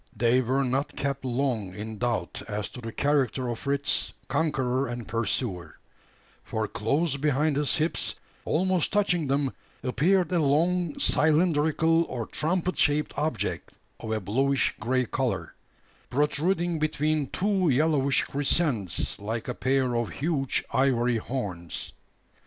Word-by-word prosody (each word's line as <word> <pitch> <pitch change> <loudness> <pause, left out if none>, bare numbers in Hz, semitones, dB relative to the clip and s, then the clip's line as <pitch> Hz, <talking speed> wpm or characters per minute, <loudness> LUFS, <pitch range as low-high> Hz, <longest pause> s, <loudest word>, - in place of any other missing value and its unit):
They 120 +2 +3
were 130 +3 +1
not 135 +2 -1
kept 140 -1 -2
long 120 -7 -1
in 110 0 -6
doubt 120 -2 -2
as 105 -1 -3
to 125 - -9
the 115 -1 -5
character 140 -1 +1
of 120 - -3
Fritz's 140 0 0
conqueror 135 -2 0
and 120 -1 -5
pursuer: 110 -4 -2 0.7
for 110 -1 -2
close 140 +9 0
behind 150 +1 +1
his 145 0 +2
hips, 160 +2 0 0.3
almost 185 0 +1
touching 180 -6 +2
them, 135 0 0 0.3
appeared 165 +8 +2
a 175 - +2
long, 165 +3 +1
cylindrical, 160 +1 +3
or 120 -6 -4
trumpet 180 +7 -1
shaped 150 0 +2
object, 155 +2 -2 0.3
of 110 - -5
a 110 - 0
bluish 130 +8 +1
grey 125 +3 +1
colour, - - -2 0.6
protruding 165 +5 +1
between 155 -1 0
two 190 +2 +1
yellowish 140 -1 +3
crescents, 135 - 0
like 110 +3 -4
a 125 - -2
pair 130 -1 +1
of 120 -2 0
huge 140 -3 -1
ivory 125 -3 +2
horns. 100 - -5
140 Hz, 130 wpm, -27 LUFS, 120-155 Hz, 0.7 s, They